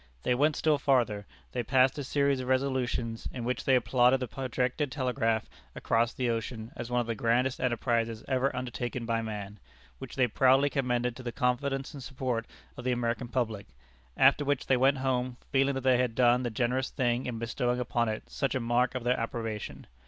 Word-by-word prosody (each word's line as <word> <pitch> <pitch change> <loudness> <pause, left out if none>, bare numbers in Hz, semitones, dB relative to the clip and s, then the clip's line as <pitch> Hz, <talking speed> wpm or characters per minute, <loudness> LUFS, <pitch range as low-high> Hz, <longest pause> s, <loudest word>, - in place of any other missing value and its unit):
They - - +2
went 145 +4 +2
still 155 -2 +2
farther, 120 -8 +1 0.2
they - - -1
passed 130 +2 +3
a - - -3
series 140 0 +1
of 130 - -5
resolutions, 130 -3 -1
in 125 - -6
which 125 +2 -2
they 135 - +5
applauded 125 +1 +3
the 125 - -3
projected 130 +3 -2
telegraph 125 -5 0 0.3
across 115 0 +1
the 125 - -2
ocean 115 0 -3
as 120 - -6
one 125 0 +1
of - - -3
the 115 - -2
grandest 120 +4 +1
enterprises 115 -2 0
ever 130 0 +2
undertaken 125 -1 -4
by 115 0 0
man, 105 -2 -6 0.4
which - - -8
they 130 - +4
proudly 135 +4 +4
commended 125 -3 0
to - - -8
the 120 -1 -4
confidence 135 +4 -1
and 140 - -8
support 125 -3 -3 0.3
of 125 - -7
the 125 - 0
American 120 0 -1
public, 110 -5 -2 0.5
after 145 - +5
which 145 -1 0
they 130 - +3
went 135 +2 +3
home, 130 -1 -1
feeling 135 0 +2
that 135 - -2
they 130 -1 +3
had 125 -3 0
done 125 0 +4
the 120 - -1
generous 125 +3 0
thing 120 0 0
in 120 -2 -3
bestowing 120 +2 -1
upon 120 -1 0
it 110 - -3
such 135 - -2
a - - +1
mark 120 +2 +1
of 125 - -3
their 125 +1 +1
approbation. 115 -2 -4
125 Hz, 195 wpm, -29 LUFS, 115-130 Hz, 0.5 s, they